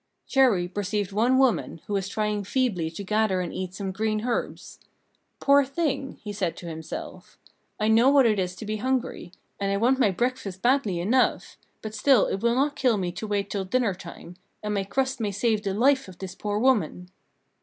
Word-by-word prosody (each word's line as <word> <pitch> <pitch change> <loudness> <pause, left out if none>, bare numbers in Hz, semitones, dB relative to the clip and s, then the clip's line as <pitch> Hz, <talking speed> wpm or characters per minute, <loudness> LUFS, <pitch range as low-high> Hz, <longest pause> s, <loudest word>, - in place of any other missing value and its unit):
Chéri 235 -10 +3
perceived 205 -1 -2
one 235 +6 +2
woman, 260 -10 +1
who 205 - -5
was 195 -1 -1
trying 210 -1 -1
feebly 200 -7 0
to 165 +5 -7
gather 210 -1 +1
and 180 -2 -3
eat 185 0 -5
some 195 -1 -4
green 215 +2 -1
herbs. 245 - -3 0.6
"Poor 280 0 +5
thing!" 275 -1 -2
said 185 -5 -1
he - - -26
to - - -9
himself; 160 -1 -8 0.4
"I 215 - +1
know 225 +4 +5
what 275 -2 +5
it 215 -3 +3
is 180 -1 -2
to 215 - -8
be 215 +1 -2
hungry, 255 -6 -2 0.3
and 200 0 -1
I 200 - +1
want 250 +5 +2
my 230 - +4
breakfast 200 -2 -3
badly 240 -8 +2
enough; 235 +9 +1 0.3
but 215 -1 -5
still 230 +2 +4
it 195 - -2
will 235 0 +2
not 285 +3 +1
kill 255 -6 +2
me 180 -2 -2
to 215 +5 -6
wait 200 -1 -2
till 200 -2 -1
dinner 215 +2 +1
time, 175 -1 -11 0.3
and 210 0 -2
my 195 -1 -1
crust 265 +6 -1
may 210 -3 -1
save 215 +2 0
the 195 - -1
life 265 +3 +3
of 185 - -12
this 190 -1 -7
poor 205 +1 -3
woman." 205 -7 +1
210 Hz, 200 wpm, -26 LUFS, 190-255 Hz, 0.6 s, Poor